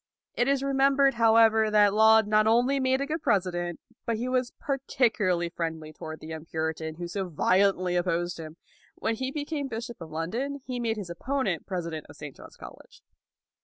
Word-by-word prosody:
It 245 - +1
is 275 -1 +1
remembered, 275 0 +3
however, 225 -1 +4
that 210 -1 +4
Laud 220 0 +6
not 215 +1 +3
only 245 +5 +3
made 260 0 +1
a - - 0
good 315 +3 -3
president, 180 - 0 0.3
but 230 - +1
that - - -2
he 240 +3 -3
was 255 -1 0
particularly 230 -10 0
friendly 160 -2 -5
toward 155 +1 -8
the 155 - -9
young 160 -1 -6
Puritan 160 0 -3
who 175 +1 -5
so 190 +1 -4
violently 185 +2 +2
opposed 175 -1 -1
him. 160 0 -9 0.4
When 225 - -1
he 260 +3 -3
became 290 0 -3
bishop 235 -3 -6
of 165 - -8
London, 230 - -3
he 250 -1 -4
made 225 -2 -1
his 190 -5 -6
opponent 215 -1 -2
president 170 -5 -4
of - - -12
St. 150 -2 -9
John's - - -14
College. - - -13
215 Hz, 185 wpm, -27 LUFS, 175-255 Hz, 0.4 s, Laud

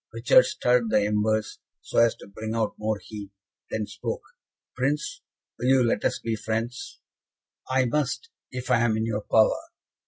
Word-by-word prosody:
Richard - - +5
stirred 125 -2 +2
the 105 - +4
embers, 105 0 0 0.2
so - - 0
as 115 0 +5
to - - -13
bring 110 +2 -5
out 110 -2 0
more 110 0 0
heat, 105 -2 -8 0.4
then 110 -1 -2
spoke: - - -5 0.5
"Prince, 150 - -1 0.4
will 125 - -1
you 130 -1 +5
let 115 - +1
us - - +1
be 115 -1 -2
friends?" 115 +3 -4 0.7
"I 130 0 +3
must, 150 - -1 0.2
if 125 0 -5
I 120 - +5
am 115 -2 +2
in 110 - 0
your 110 -2 -1
power." 110 +1 +4
115 Hz, 165 wpm, -26 LUFS, 110-125 Hz, 0.7 s, Richard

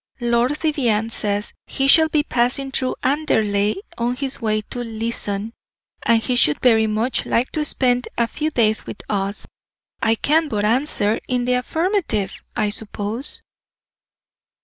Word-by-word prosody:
Lord 240 +4 +1
Vivianne 235 -9 0
says 205 -1 0
he 270 - 0
shall 315 +3 +6
be 305 -1 +2
passing 260 +1 0
through 255 -1 -1
Anderley 225 - +1 0.2
on 240 +1 0
his 270 0 -1
way 215 -1 0
to 245 - -6
Leeson, 225 -2 -4 0.5
and 230 -1 +4
he 250 - 0
should 150 -11 +3
very 225 -3 +4
much 220 +4 0
like 245 +2 +1
to 305 - -1
spend 250 -4 +2
a 235 - +3
few 300 +6 -2
days 220 -6 +1
with - - -7
us. 200 0 -2 0.6
I 225 0 +3
can 310 +7 +2
but 210 -6 -1
answer 225 -2 +1
in 250 -1 0
the 250 - +2
affirmative, 320 - 0 0.2
I 210 -1 0
suppose." 215 +4 -3
235 Hz, 150 wpm, -21 LUFS, 215-270 Hz, 0.6 s, shall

